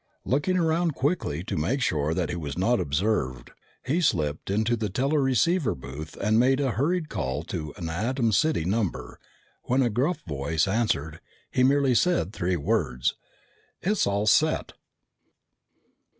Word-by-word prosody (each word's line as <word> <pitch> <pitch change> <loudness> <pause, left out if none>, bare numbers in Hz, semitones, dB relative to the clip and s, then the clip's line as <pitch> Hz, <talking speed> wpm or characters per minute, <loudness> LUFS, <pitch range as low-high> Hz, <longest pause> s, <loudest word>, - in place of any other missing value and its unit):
Looking 150 +8 +1
around 165 -2 +1
quickly 135 - -1
to - - -4
make 105 - 0
sure 75 - 0
that 85 -3 -1
he - - -3
was 75 -4 -5
not 115 +6 +2
observed, 70 - -1 0.3
he 155 +7 +1
slipped 80 - 0
into 110 +4 +1
the 110 -2 -2
teleceiver 140 - +1
booth 70 +4 -9
and 110 +2 +2
made 130 +2 +3
a 135 -3 +1
hurried 160 +7 0
call 70 - -3
to 80 -3 -5
an 85 - -5
Atom 115 +8 0
City 155 - +2
number. 100 0 -2 0.5
When 130 +2 +2
a 120 - +1
gruff 140 +11 0
voice 75 +2 -1
answered, 95 -8 -1 0.3
he 125 - +2
merely 135 0 +4
said 120 - +1
three 90 -2 -1
words: 75 - 0 0.7
"It's 205 +2 +1
all 100 +1 0
set!" 155 +8 +2
110 Hz, 150 wpm, -26 LUFS, -, 0.7 s, merely